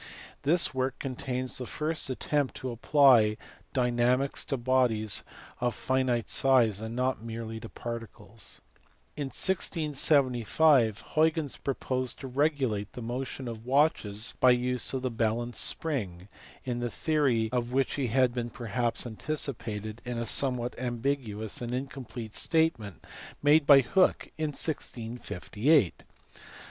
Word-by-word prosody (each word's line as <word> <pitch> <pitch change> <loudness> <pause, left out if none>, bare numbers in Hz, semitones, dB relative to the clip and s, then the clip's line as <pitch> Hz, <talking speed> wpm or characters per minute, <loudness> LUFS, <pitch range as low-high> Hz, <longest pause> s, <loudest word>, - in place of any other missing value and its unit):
This 165 +2 +3
work 130 0 -1
contains 130 -1 -4
the 125 - -5
first 155 -2 -2
attempt 140 +1 -1
to 130 - -5
apply 120 -3 +4 0.3
dynamics 125 +1 +1
to 135 - -2
bodies 120 -4 +1 0.4
of 120 -1 -1
finite 130 -3 0
size 120 -6 +3
and 110 +1 -5
not 130 -1 0
merely 115 -1 -6
to 110 - -9
particles. 115 -3 -8 0.5
In 145 -2 -3
1675 140 - +2
Huygens 155 -2 +1
proposed 130 -2 -2
to 135 - -6
regulate 130 -7 0
the 125 - -7
motion 125 +2 -4
of 115 -1 -7
watches 125 -5 +1
by 125 -1 +6
the - - +2
use 125 0 -1
of 130 -1 -3
the 130 - -1
balance 115 +1 -1
spring, 100 - +1 0.4
in 125 -2 -2
the 120 0 -2
theory 130 -8 +1
of 120 -1 -1
which 135 +1 +1
he 140 -3 -1
had 125 +1 +2
been 120 -1 -3
perhaps 120 +1 -2
anticipated 115 -4 -4
in 120 -1 -4
a 115 - -2
somewhat 125 0 +1
am 120 -1 -3
biguous 115 -6 -3
and 120 +1 -3
incomplete 125 -4 -7
statement 160 - 0 0.4
made 145 0 +5
by 140 -2 +9
Hooke 185 +8 +1
in 155 -2 -2
1G58. 120 - 0
125 Hz, 135 wpm, -29 LUFS, 115-140 Hz, 0.5 s, by